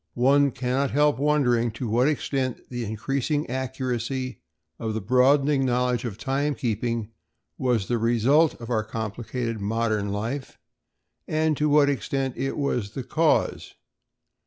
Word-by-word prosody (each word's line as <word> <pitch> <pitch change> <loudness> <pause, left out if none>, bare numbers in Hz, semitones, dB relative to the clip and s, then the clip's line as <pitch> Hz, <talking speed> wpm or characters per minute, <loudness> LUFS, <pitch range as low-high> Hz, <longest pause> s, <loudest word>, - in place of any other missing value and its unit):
One 140 +3 +4
cannot 130 +2 -1
help 145 0 +2
wondering 130 -5 +2
to 120 +2 -4
what 120 +5 +2
extent 135 -5 -2
the 120 -2 -3
increasing 135 +7 -1
accuracy 130 0 -3 0.4
of 110 -1 -3
the - - 0
broadening 135 +6 +3
knowledge 125 -1 +1
of 110 -4 -4
time 140 +3 -1
keeping 115 -1 -2 0.5
was 120 -6 +1
the 120 -1 0
result 120 +8 +3
of 115 +1 -7
our 110 -2 +1
complicated 110 +1 -4
modern 110 -1 0
life 115 +7 -4 0.7
and 155 0 +1
to 150 +1 +1
what 145 -1 +5
extent 135 -1 -1
it 135 - -3
was 120 -7 -2
the 135 - -3
cause. 160 +4 +1
125 Hz, 135 wpm, -25 LUFS, 115-140 Hz, 0.7 s, what